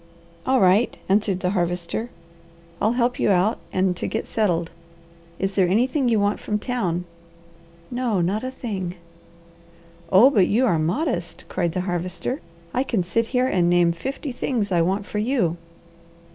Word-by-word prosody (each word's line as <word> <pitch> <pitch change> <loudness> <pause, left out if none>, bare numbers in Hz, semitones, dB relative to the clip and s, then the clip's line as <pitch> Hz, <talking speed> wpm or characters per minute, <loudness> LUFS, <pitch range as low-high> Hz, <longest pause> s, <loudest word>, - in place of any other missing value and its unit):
"All 260 0 +4
right!" 195 +5 +3
answered 195 -1 +1
the 180 - 0
Harvester. 175 +4 -2 0.7
"I'll 220 - +3
help 245 0 0
you - - +2
out 195 +4 +2
and 185 -1 +1
to - - -2
get 220 - -3
settled. 175 -6 0 0.7
Is 195 0 -1
there 190 -2 +3
anything 250 - +2
you 225 -2 +3
want 205 +1 +1
from 210 - -2
town?" 190 -7 -2 0.9
"No, 245 -5 0
not 195 +6 0
a 255 - -2
thing!" 195 -9 -4 1.2
"Oh 220 +9 +7
but 200 -8 +4
you 240 +5 +3
are 175 -9 +2
modest!" 175 - -2
cried 175 -3 -1
the 185 - -1
Harvester. 180 - -3 0.3
"I 255 - +1
can 235 -8 0
sit 225 +6 0
here 250 0 +1
and 180 -8 +2
name 175 -1 +4
fifty 265 - -5
things 235 -4 -2
I 175 -2 +3
want 190 +4 0
for 210 - -3
you." 210 -8 +1
200 Hz, 160 wpm, -23 LUFS, 180-240 Hz, 1.2 s, Oh